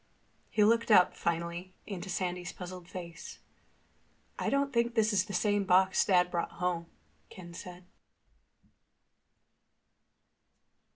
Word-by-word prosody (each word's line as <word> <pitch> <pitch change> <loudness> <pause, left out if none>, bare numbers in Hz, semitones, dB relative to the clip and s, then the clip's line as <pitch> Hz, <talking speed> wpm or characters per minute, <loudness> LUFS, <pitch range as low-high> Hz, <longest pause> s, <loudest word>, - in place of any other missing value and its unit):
He 210 - +3
looked 230 +2 +3
up, 185 -4 +6
finally, 170 +2 -3
into 195 -2 -6
Sandy's 180 -1 -3
puzzled 180 -1 -9
face. 170 -2 -8 1.0
"I - - 0
don't 275 0 0
think 235 0 +1
this 215 -1 +3
is 190 -1 +2
the 210 - -8
same 205 +2 +1
box 190 0 +4
Dad 180 -2 +3
brought 170 - -2
home," 175 -2 -2 0.4
Ken 175 -2 -11
said. 180 +1 -10
185 Hz, 115 wpm, -31 LUFS, 175-205 Hz, 1.0 s, up